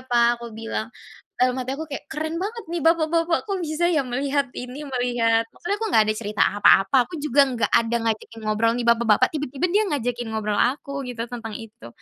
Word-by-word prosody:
Pak," 240 -1 +2
aku 235 - -7
bilang. 225 0 -4 0.5
Dalam 250 0 +3
hati 255 0 -4
aku 320 - -5
kayak 275 - -5
keren 315 +1 -3
banget 445 +2 -5
nih 340 -2 -2
bapak-bapak 330 +1 +2
kok 395 -2 -2
bisa 310 +3 0
ya 310 -5 +2
melihat 275 +3 0
ini, 250 +4 -7
melihat 240 -3 +1
maksudnya 405 +4 -3
aku 445 - -1
nggak 220 - +5
ada 215 - 0
cerita 210 -2 -1 0.2
apa-apa, 205 +6 +5
aku 355 - -9
juga 285 -1 +4
enggak 245 -3 -1
ada 230 +1 +2
ngajakin 225 +1 -6
ngobrol 215 +2 +2
nih - - -1
bapak-bapak 235 +1 +4
tiba-tiba 285 +2 -1
dia 410 +4 +3
ngajakin 245 -4 -2
ngobrol 210 -1 -1
aku 275 +1 -1
gitu 245 -2 -4
tentang 225 -3 -6
itu, 225 - -12
250 Hz, 195 wpm, -23 LUFS, 230-300 Hz, 0.5 s, nggak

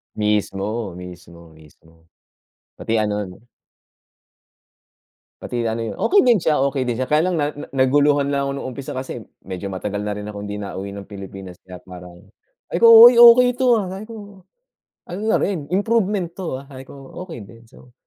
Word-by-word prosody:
Mismo, 105 0 -2
mismo, 85 -2 -12
mismo, 80 +1 -21 0.7
pati 115 - -3
ano, 105 -1 -2
'no. 90 +6 -15 2.0
Pati 120 - -4
ano 115 +1 -3
iyon, 115 - -6
okey 400 +1 +3
din 240 -4 +4
siya 155 -2 +1 0.2
okey 130 -3 -3
din 120 - -1
siya, 130 - -2
kaya 150 +4 +1
lang 185 - -1
na 150 -2 -1
na 145 - -10
naguluhan 140 +2 +2
lang 140 0 -1
ako 140 - -2
noong 140 - -5
umpisa 130 0 -8
kasi 130 0 -6 0.2
medyo 95 +1 -6
matagal 100 +2 -4
na 105 0 -4
rin 105 - -7
akong 105 -1 -7
hindi 105 - -5
nauwi 100 -1 -7
ng 100 - -8
Pilipinas 95 -2 -10
kaya 90 -1 -11
parang, 90 -1 -13 0.5
ay - - -1
ko 230 - +6 0.2
okey 240 +1 +7
ito, 250 -1 +2
ah, 195 -5 -2
sabi 195 +3 -8
ko 205 -4 -11 0.7
ano 190 - -5
na - - +3
rin 165 -8 -2
improvement 200 -1 0
to, 175 -7 -5
ah, 135 - -10
sabi 130 0 -11
ko - - -12 0.3
"Okey 140 -11 -9
din" 115 +3 -17
so. 125 +2 -19
120 Hz, 180 wpm, -20 LUFS, -, 2.0 s, okey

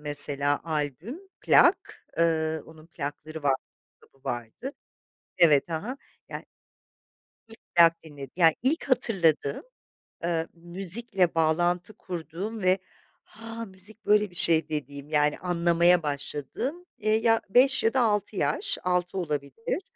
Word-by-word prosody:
mesela 145 -1 +3
albüm, 155 - -4 0.2
plak, - - +3
ııı, 160 -2 +1
onun 160 0 -15
plakları 155 0 -7
vardı, 135 -2 +1 0.3
kitabı 135 -1 -27
vardı. 120 - -5 0.7
Evet, 155 -2 +4
ha 160 +1 -3
ha. 255 +5 -5 0.3
Yani, - - -7 1.0
ilk 225 0 -13 0.2
plak 165 -1 +5
dinlediğim, 140 -4 -10
yani, 165 -3 +4
ilk 280 +7 +1
hatırladığım, 165 - +1 0.6
eee, 165 -1 -1
müzikle 180 +2 +1
bağlantı 175 +4 +1
kurduğum 185 +4 -6
ve 185 +1 +3 0.5
'Ha, 225 +1 -9
müzik 205 +2 -12
böyle 210 -1 +3
bir - - -19
şey.' 160 -3 +5
dediğim, 140 -2 -5
yani 150 -1 +1
anlamaya 175 0 +2
başladığım. 150 - -4
Eee, 215 0 +1
ya 225 0 +2
5 265 +5 +4
ya 225 - +2
da 265 - +3
6 210 -2 0
yaş, 145 -3 -1
6 180 +1 -1
olabilir. 150 - -4
170 Hz, 125 wpm, -26 LUFS, 150-210 Hz, 1.0 s, plak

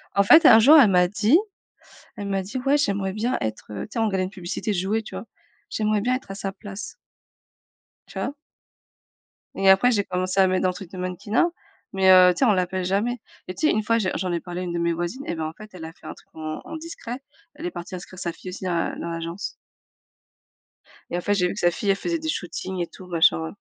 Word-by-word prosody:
En 200 - +5
fait, 320 - +7
un 225 - +9
jour 285 +8 +8
elle 260 -8 +7
m'a 180 -1 +4
dit 210 - +3 0.8
elle 205 -1 -5
m'a 195 -1 0
dit: 210 +8 -5
«Ouais, 280 +2 +5
j'aimerais 200 -9 0
bien 230 +5 -1
être, 110 0 -4
heu» 105 - -4
tu 215 - -26
sais, - - -3
on 225 - +2
regardait 190 -3 0
une 185 - -5
publicité 185 +1 -4
de - - -1
jouets 200 +5 0
tu - - -11
vois: 215 - -6 0.4
«J'aimerais 215 -1 0
bien 250 +5 +1
être 260 - -10
à - - -4
sa 195 0 -4
place». 200 +1 -8 1.1
Tu - - -11
vois? - - -2 1.2
Et 195 0 +3
après 195 +6 +6
j'ai 205 -4 +2
commencé 185 0 -2
à 190 - +6
mettre 185 0 0
dans 185 - +3
le 180 - -2
truc 185 -2 -10
de 185 - -9
mannequinat, 185 - 0 0.5
mais 190 -1 +3
heu, 180 -1 +8
tu - - -8
sais, 270 - +4
on 220 - +5
l'appelle 185 0 -1
jamais 215 +6 0 0.3
et 185 - -4
tu 310 - +1
sais - - +4
1 215 - 0
fois 230 +2 +2
j'ai 195 -5 0
j'en 180 0 -2
ai 170 - 0
parlé 180 0 -6
à - - -3
une 175 -1 -4
de 170 - -1
mes 170 0 +1
voisines 175 +12 -4
et - - -3
ben, 160 - -3
en 155 - -5
fait 215 +4 -12
elle 165 -3 -8
a 160 - -9
fait - - -21
un - - -5
truc - - -21
en 155 0 -5
en - - -8
discret, 310 -6 -7 0.4
elle 310 +3 -8
est 355 - -2
partie 175 - -7
inscrire 180 0 -10
sa 175 -2 -2
fille 185 - -9
aussi 185 +1 -7
à 170 -2 -1
dans 170 - -5
l'agence. 170 +4 -5 1.6
Et 175 - -2
en - - -2
fait, 205 - +1
j'ai 180 -2 +2
vu - - -3
que 205 - -6
sa 175 - +3
fille, 200 +4 -3
elle 195 - +4
faisait 335 - -2
des 315 0 -4
shootings 185 - -4
et 170 - -2
tout 185 - -13
machin. 80 - +2
190 Hz, 260 wpm, -24 LUFS, 180-215 Hz, 1.6 s, un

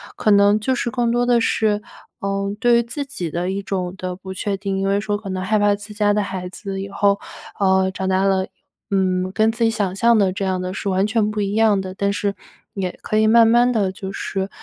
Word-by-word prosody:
可 215 - +1
能 200 +1 +5
就 260 +5 0
是 245 - -1
更 240 -1 0
多 240 +1 +1
的 245 -1 +3
是， 215 -2 +1 0.4
嗯， 200 0 -2
对 240 +1 +4
于 - - +1
自 280 +5 -5
己 180 -10 -5
的 175 +4 -2
一 195 +1 -3
种 185 -2 -3
的 185 -1 -4
不 190 +1 -8
确 200 +1 -2
定。 195 0 -3
因 195 - 0
为 200 +1 +2
说 205 -1 -1
可 205 -1 -8
能 185 0 -3
害 215 +2 +1
怕 205 0 +3
自 205 +1 -10
家 205 -1 +2
的 210 0 +1
孩 185 -2 -5
子 195 +1 -6
以 195 - -6
后， 200 0 +2 0.4
呃， 190 -1 +3
长 190 0 -4
大 190 0 +2
了， 190 -1 +1 0.4
嗯， 185 -1 +1
跟 220 +1 +3
自 235 +1 -2
己 225 - +4
想 205 -5 -1
象 235 +3 +4
的 195 -3 +3
这 200 +1 -4
样 185 -1 -1
的 185 0 -4
是 195 - -5
完 190 +1 +2
全 215 -1 +1
不 210 0 -2
一 200 0 -1
样 215 -2 +3
的。 185 -1 -6
但 200 +1 0
是 200 0 -2 0.4
也 185 -3 -4
可 215 - -1
以 215 0 +4
慢 230 +1 +6
慢 240 +2 +4
地 205 -5 +1
就 190 0 -7
是 195 0 -3
200 Hz, 265 characters per minute, -21 LUFS, 190-215 Hz, 0.4 s, 慢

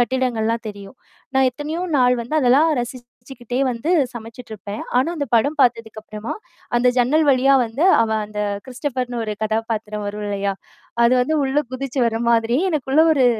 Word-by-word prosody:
கட்டிடங்கள்லாம் 235 -2 0
தெரியும். 200 +3 -10 0.4
நான் 265 -1 +4
எத்தனையோ 305 +6 -5
நாள் 250 -1 +4
வந்து 245 +7 -5
அதெல்லாம் 275 +5 +4
ரசிச்சுக்கிட்டே 245 0 -7
வந்து 240 +7 -3 0.2
சமைச்சிட்டுருப்பேன். 220 -3 -8 0.2
ஆனா, 260 - +2
அந்த 285 -4 -3
படம் 285 +7 +1
பாத்ததுக்கு 230 -3 0
அப்புறமா 215 +1 -6 0.4
அந்த 250 - +3
ஜன்னல் 295 +6 +3
வழியா 270 +1 +4
வந்து 250 +10 -2 0.2
அவன் 220 -1 0
அந்த 210 0 -6 0.3
கிறிஸ்டோபர்ன்னு 250 -2 -3
ஒரு 215 -1 -3
கதாபாத்திரம் 215 -1 -3
வரும் 210 0 -5
இல்லையா? 200 -1 -1 0.5
அது 235 - +4
வந்து 310 +5 0
உள்ள 275 +2 +1
குதிச்சு 265 0 -3
வர 225 0 -2
மாதிரியே 235 +7 +2
எனக்குள்ள 295 +1 +2
ஒரு 260 -4 +4
245 Hz, 150 wpm, -20 LUFS, 220-265 Hz, 0.5 s, நான்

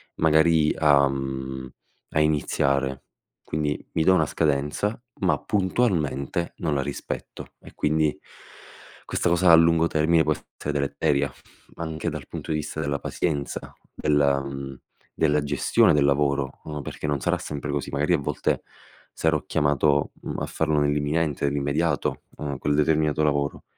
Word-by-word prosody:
magari 80 0 +4
a 70 -2 +5
mhmm, 65 -1 -4 0.4
a - - +1
iniziare." 70 -3 +1 0.5
Quindi 75 -1 -1
mi 80 - +2
do 95 - +5
una 80 - +3
scadenza, 75 +10 -1 0.2
ma 85 -7 +2
puntualmente 85 - 0
non 80 -3 -1
la 70 - +1
rispetto. 70 +1 -6
E - - -13
quindi 75 -1 +1 0.9
questa - - 0
cosa 85 +1 +4
a 85 - +10
lungo 85 0 +4
termine 80 +1 +3
può 75 0 +2
essere 75 0 -7
deleteria, 70 0 0 0.4
anche 80 0 -3
dal 75 -5 -7
punto - - -6
di 75 - +1
vista 75 +1 -4
della 70 -2 -1
pazienza, 75 -5 -3 0.2
della 70 -2 +2
mhmm, 70 -1 -6 0.4
della 75 -1 +2
gestione 70 0 +3
del 75 - +3
lavoro, 70 -1 +1
uhm, 75 -1 -5
perché 75 - -6
non 70 -2 -1
sarà - - +1
sempre 75 0 -5
così, 70 -1 -2
magari 75 +5 +1
a - - +4
volte 70 - -1 0.5
sarò 80 -2 +1
chiamato, 70 -1 +2
mhmm, - - -4
a - - -2
farlo 75 -2 0
nell'imminente, 75 +1 0
nell'immediato, 70 +2 0
mhmm, 70 -2 -4
quel 75 0 0
determinato 75 0 +2
lavoro. 70 -1 0
75 Hz, 145 wpm, -25 LUFS, 70-80 Hz, 0.9 s, a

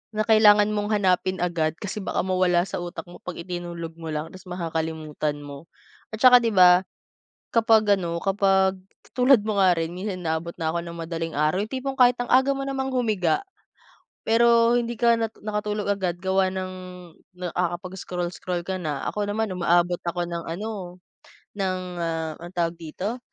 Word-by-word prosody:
Na 215 - +1
kailangan 210 -2 +6
mong 205 0 -1
hanapin 185 -1 +1
agad 165 -2 0
kasi 205 +1 -5
baka - - -1
mawala 185 -2 +2
sa - - -4
utak 175 -2 -6
mo 175 - -12
'pag 180 - -6
itinulog 170 -1 -6
mo 165 - -7
lang 155 +1 -4
tapos 185 0 -13
makakalimutan 160 -3 -3
mo. 145 +2 -10 0.5
At - - -11
tsaka 250 -1 +9
'di 230 - +1
ba? 180 0 +7 0.7
Kapag 220 -3 +4
ano, 170 -2 -3
kapag 195 -1 +2 0.4
tulad 250 -2 +6
mo 215 -2 -1
nga 185 -1 +6
rin 165 +1 -2
minsan 190 -1 -4
inaabot 160 +1 -2
na 160 - 0
ako 170 - -1
ng 170 0 -8
madaling 165 -1 -3
araw 150 +4 +2
yung 215 - -7
tipong 265 +1 -3
kahit 245 -1 +6
ang 245 - -3
aga 265 +2 +5
mo 275 - -3
namang 265 -1 -2
humiga, 215 -10 +1 0.9
pero 235 +1 +5
hindi 235 0 -2
ka 235 -1 +5
natu 225 -1 -3
nakatulog 210 -1 -2
agad 185 -3 -1
gawa 190 0 +2
ng 185 0 -4 0.7
nakakapag-scroll-scroll 180 0 -3
ka 190 - -1
na, 150 -4 -3
ako 210 - -2
naman 215 +1 -1
umaabot 175 0 +2
ako 175 0 -1
ng 170 -1 -4
ano, 185 0 -6 0.6
ng, 185 -1 0 0.2
ah, 165 -1 -2
anong 175 +1 -10
tawag 170 0 0
dito? 185 +9 -5
185 Hz, 170 wpm, -24 LUFS, 170-215 Hz, 0.9 s, tsaka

